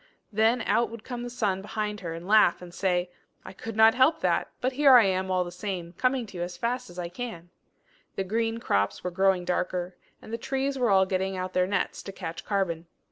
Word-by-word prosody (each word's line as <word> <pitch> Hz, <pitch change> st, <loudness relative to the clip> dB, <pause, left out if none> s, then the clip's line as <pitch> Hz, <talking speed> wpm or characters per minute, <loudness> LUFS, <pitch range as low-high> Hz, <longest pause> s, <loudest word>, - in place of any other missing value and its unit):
Then 225 Hz, +3 st, +3 dB
out 235 Hz, -2 st, +2 dB
would 230 Hz, -1 st, -9 dB
come 245 Hz, -2 st, -5 dB
the 245 Hz, -, -5 dB
sun 205 Hz, -6 st, -1 dB
behind 210 Hz, 0 st, -3 dB
her, 165 Hz, -3 st, -5 dB
and 170 Hz, +2 st, -8 dB
laugh, 210 Hz, -5 st, +5 dB
and 175 Hz, -1 st, -11 dB
say 180 Hz, -1 st, 0 dB, 0.3 s
"I -, -, -9 dB
could 225 Hz, +3 st, -7 dB
not 220 Hz, +1 st, +7 dB
help 260 Hz, +5 st, +4 dB
that; -, -, +1 dB
but 255 Hz, -, 0 dB
here 275 Hz, 0 st, +6 dB
I 240 Hz, -, +8 dB
am 190 Hz, 0 st, 0 dB
all 185 Hz, -1 st, +2 dB
the 175 Hz, -, -7 dB
same, 180 Hz, -2 st, -5 dB
coming 255 Hz, +4 st, 0 dB
to 200 Hz, -4 st, -10 dB
you 175 Hz, -, -2 dB
as 175 Hz, 0 st, -6 dB
fast 245 Hz, 0 st, -2 dB
as 175 Hz, -, -13 dB
I 175 Hz, -1 st, -3 dB
can!" 175 Hz, -3 st, -7 dB, 0.6 s
The 195 Hz, -, -1 dB
green 225 Hz, +3 st, -1 dB
crops 100 Hz, -, 0 dB
were 180 Hz, -, -2 dB
growing 190 Hz, 0 st, +2 dB
darker, 180 Hz, 0 st, -2 dB, 0.2 s
and 220 Hz, -, -11 dB
the 230 Hz, -, -2 dB
trees 270 Hz, +1 st, -1 dB
were 245 Hz, -2 st, +2 dB
all 190 Hz, -1 st, +5 dB
getting 190 Hz, 0 st, -1 dB
out 185 Hz, 0 st, -4 dB
their 180 Hz, 0 st, +2 dB
nets 200 Hz, -1 st, -1 dB
to 195 Hz, -, -7 dB
catch 170 Hz, -4 st, -6 dB
carbon. 175 Hz, -5 st, -1 dB
195 Hz, 230 wpm, -27 LUFS, 180-230 Hz, 0.6 s, I